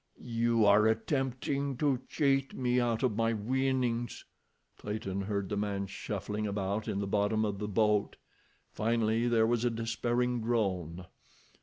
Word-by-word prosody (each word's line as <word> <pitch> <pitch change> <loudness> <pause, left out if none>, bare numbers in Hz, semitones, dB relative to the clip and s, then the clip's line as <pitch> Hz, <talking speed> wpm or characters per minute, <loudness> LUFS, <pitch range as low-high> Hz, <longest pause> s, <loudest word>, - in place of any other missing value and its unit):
"You 115 -1 +2
are 105 +2 +6
attempting 135 +3 -1
to 140 -2 +1
cheat 135 -2 +1
me 125 -1 +1
out 120 0 0
of 125 -5 +1
my 115 +1 +1
winnings." 125 +1 -1 0.5
Clayton 100 -2 -3
heard 100 -1 -2
the 105 - -3
man 100 -1 -1
shuffling 105 +2 -4
about 100 +2 -2
in 105 -3 -2
the 100 - -1
bottom 105 +2 +1
of 100 -2 -3
the 105 - -3
boat. 105 0 +1 0.6
Finally 115 +1 +1
there 115 -2 +3
was 120 0 +1
a 120 - +3
despairing 120 +2 -1
groan. 95 -7 -1
110 Hz, 145 wpm, -31 LUFS, 105-120 Hz, 0.6 s, are